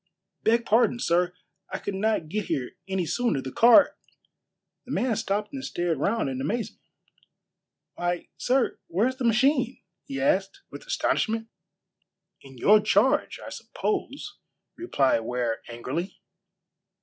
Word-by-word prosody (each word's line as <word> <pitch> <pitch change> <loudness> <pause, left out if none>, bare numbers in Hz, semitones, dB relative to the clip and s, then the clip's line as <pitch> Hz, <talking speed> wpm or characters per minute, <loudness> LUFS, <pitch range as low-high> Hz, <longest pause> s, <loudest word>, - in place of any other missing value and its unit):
"Beg 230 +1 +2
pardon, 235 +2 +3
sir, 175 -3 +2 0.4
I 190 - -3
could 200 - -5
not 195 -4 0
get 205 +5 -2
here 125 -2 -2 0.2
any 190 -2 -1
sooner. 235 - 0
The 130 0 -6
car 240 - +6 0.4
" - - -58
The - - -7
man 245 -3 +1
stopped 210 +1 -2
and 270 -1 -5
stared 175 - -1
round 210 +3 0
in 130 -1 -3
amazement. 220 - -3 1.1
"Why, 175 0 -3
sir, 255 0 +1
where's 225 +10 0
the 260 - -2
machine?" 255 +2 +2 0.2
he 275 -1 -5
asked, 200 -9 0
with - - -10
astonishment. 225 - 0 0.9
"In 135 -2 -14
your 210 - +6
charge, 265 +9 +2
I - - -6
suppose," 420 - -4 0.4
replied 140 - +1
Ware 120 0 -2
angrily. 130 +10 -5
210 Hz, 135 wpm, -26 LUFS, 165-245 Hz, 1.1 s, car